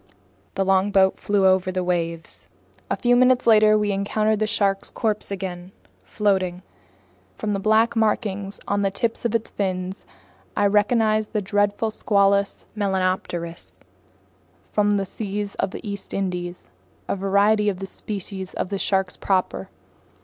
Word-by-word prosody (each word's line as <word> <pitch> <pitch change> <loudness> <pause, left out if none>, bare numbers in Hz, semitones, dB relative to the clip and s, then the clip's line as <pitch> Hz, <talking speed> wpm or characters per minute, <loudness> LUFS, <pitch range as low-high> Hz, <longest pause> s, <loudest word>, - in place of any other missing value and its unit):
The 195 - 0
longboat 190 0 +3
flew 205 -1 +1
over 185 0 +3
the 185 0 -1
waves. 170 -2 -1 0.4
A - - +1
few 245 0 +3
minutes 255 0 +4
later 215 -1 +6
we 210 -1 0
encountered 215 +2 0
the 215 - +1
shark's 200 -2 0
corpse 215 -3 -1
again, 185 -2 -5 0.3
floating. 185 - 0 0.7
From 210 - -2
the 200 - -1
black 220 +3 +3
markings 205 -3 -1
on 200 0 +1
the 195 - +2
tips 225 +4 -3
of 235 -1 +1
its 230 0 -1
fins, 185 -1 -3 0.5
I 205 - +3
recognized 215 +1 +2
the 210 - +1
dreadful 205 +2 +1
Squalus 200 -1 +1
melanopterus 185 -4 -2 0.9
from 205 -1 +2
the 195 - -1
seas 205 +1 -4
of 195 - +1
the 210 - -8
East 200 -1 -5
Indies, 180 -2 -3 0.4
a - - 0
variety 200 +2 +3
in 195 - -3
the 195 - -5
species 195 -1 -6
of 190 - -3
sharks 190 -2 0
proper. 190 -2 -1
200 Hz, 140 wpm, -23 LUFS, 190-210 Hz, 0.9 s, later